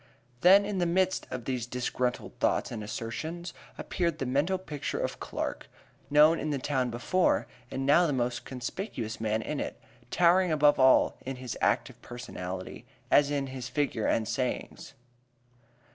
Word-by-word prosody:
Then 195 +5 +7
in 200 -2 -2
the 175 - +2
midst 185 +2 +1
of 125 -3 -5
these 125 -3 -2
disgruntled 125 0 -3
thoughts - - +1
and 110 -3 -5
assertions 160 - -5 0.2
appeared 170 -3 -1
the 135 - -3
mental 145 +9 +1
picture 150 -6 -4
of - - -3
Clark, - - -4 0.4
known 150 +3 +6
in 155 - -2
the 145 - 0
town 130 -2 -1
before, 120 +11 +1 0.2
and 135 0 -3
now 170 +5 +5
the - - 0
most 125 -2 -1
conspicuous 125 - -5
man 110 0 0
in 150 - -3
it, - - -4 0.3
towering 180 +2 +4
above 150 -2 +4
all 130 0 +5
in 135 +1 -4
his 125 -2 -6
active - - 0
personality, 95 -3 -7 0.2
as 145 -1 +5
in 140 -1 -1
his 130 -2 -6
figure 140 -7 -1
and 110 -1 +1
sayings. 125 +2 -3
135 Hz, 160 wpm, -29 LUFS, 120-170 Hz, 0.4 s, Then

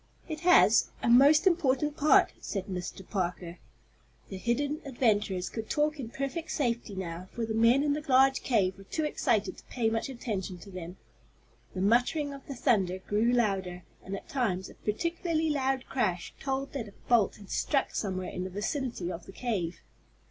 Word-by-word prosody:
"It 315 -3 -5
has 345 -10 +5
a - - +1
most 285 +7 +7
important 300 -5 +2
part," 295 -2 +4
said 195 -3 -4
Mr. 185 0 -6
Parker. 180 -2 -3 0.7
The 195 - -6
hidden 285 - -1
adventurers 210 -8 0
could 220 -1 -6
talk 300 0 +1
in 240 -4 -5
perfect 275 +6 -4
safety 240 -8 -1
now, 180 0 -6
for 235 - -2
the 220 - -3
men 230 +5 +4
in 290 -1 +2
the 300 +1 -3
large 265 +1 +5
cave 195 -6 +1
were - - -11
too 315 - -2
excited 230 -8 0
to - - -17
pay 225 -3 -1
much 225 +4 -1
attention 205 -7 -4
to 200 - -11
them. 180 0 -8 0.8
The 185 - -2
muttering 245 +8 +2
of 275 -1 -11
the 275 - -5
thunder 200 -8 +2
grew 210 +5 +1
louder, 195 -7 0 0.2
and 195 - -5
at - - -9
times 200 -9 -1
a - - -14
particularly 325 - -1
loud 270 -2 0
crash 180 -9 -1
told 270 0 -3
that 250 -6 -4
a 200 - -13
bolt 235 -5 +3
had 200 -2 -13
struck 275 -3 0
somewhere 185 -3 -2
in 180 - -4
the 185 - -4
vicinity 210 - -3
of 170 0 -8
the - - -9
cave. 195 -7 -3
230 Hz, 180 wpm, -29 LUFS, 190-275 Hz, 0.8 s, most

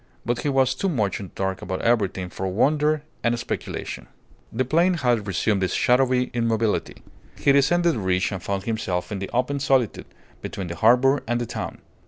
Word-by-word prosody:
But 120 +1 0
he 145 - -1
was 135 -1 +3
too 190 +9 -1
much 105 - 0
in 100 - -6
the - - -19
dark 95 -1 -2
about 95 - -4
everything 100 -6 +1
for 95 - -4
wonder 150 +9 +2 0.2
and 120 0 +2
speculation. - - -5 0.4
The 130 +3 -1
plain 170 +7 +3
had 120 -8 +1
resumed 100 +2 0
its 95 - 0
shadowy 125 0 +2
immobility. 115 -2 -1 0.3
He 140 - +3
descended 170 +5 +3
the 115 - -3
ridge 95 -1 0
and 95 -3 -4
found 100 0 -3
himself 105 -4 -2
in 100 - -3
the 95 - -5
open 130 +4 0
solitude, 135 -5 +1 0.3
between 95 -3 -5
the 85 - -5
harbour 125 - +4
and 120 +1 0
the 120 - -2
town. 115 -2 -6
120 Hz, 190 wpm, -24 LUFS, 100-135 Hz, 0.4 s, harbour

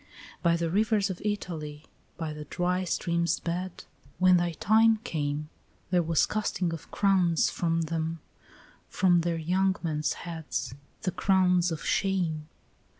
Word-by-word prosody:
By 170 -1 +3
the 170 -1 -1
rivers 205 0 +2
of 180 - -7
Italy, 160 -8 -4 0.3
by 160 -2 -3
the 150 0 -8
dry 180 +4 -1
streams' 170 -1 0
beds, 180 +2 -4 0.3
When 185 0 +6
thy 175 -1 0
time 220 +6 +4
came, 150 -6 -2 0.4
There 180 -1 +4
was 165 -2 +2
casting 190 -5 -1
of 165 - -8
crowns 185 -5 +2
from 165 -1 0
them, 165 0 -2 0.7
from 175 -2 +3
their 170 0 -1
young 185 +4 +1
men's 155 -2 0
heads, 160 -7 -4 0.3
The 185 - 0
crowns 180 -2 +3
of 160 - -5
shame. 175 -6 0
170 Hz, 140 wpm, -28 LUFS, 160-185 Hz, 0.7 s, When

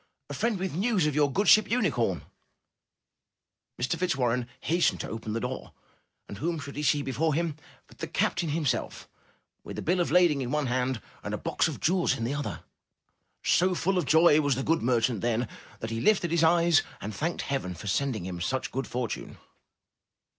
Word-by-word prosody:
*'A - - -5
friend 230 -3 0
with 185 -2 -3
news 195 0 +1
of 150 - +1
your 145 -1 +2
good 200 +8 0
ship 215 - +7
^Unicorn.' 140 - 0 0.8
'* - - -37
Mr. 125 +2 0
Fitz 180 -5 +1
warren 125 -2 0
hastened 170 +2 +1
to - - -4
open 110 -1 -5
the 115 - -1
door 125 +2 -5 0.5
and 100 - -8
whom 165 +4 -1
should 140 -1 -8
he 150 - -3
see 145 0 +2
before 145 +3 0
him 165 -2 -1 0.3
but - - -20
the - - -3
captain 175 -2 0
him 155 +1 -1
self, 135 - -2 0.6
with - - -8
a - - -3
bill 180 +3 +1
of 175 - +1
lading 170 -4 +4
in 125 - -3
one 150 +1 0
hand, 125 0 0 0.2
and - - -3
a - - -4
box - - 0
of - - -5
jewels 175 +2 +2
in 115 - -4
the 120 +4 -1
other. 145 0 -4 0.8
So 185 +1 +3
full 185 +2 +1
of 170 - -1
joy 160 0 +6
was 145 -3 +1
the 135 - -2
good 165 +3 +1
mer 120 0 +2
chant 115 -3 0
then, 120 0 0 0.3
that 115 - -4
he 115 0 -2
lifted 195 -6 +3
his 170 -1 +2
eyes 170 -1 +5 0.2
and 105 +2 -5
thanked 160 +11 -2
Heaven 115 -10 -3
for 85 - -10
sending 110 -1 -1
him 90 -2 -5
such 130 +9 -2
good 135 +1 -3
fortune. 120 -3 -4
145 Hz, 205 wpm, -28 LUFS, 120-170 Hz, 0.8 s, ship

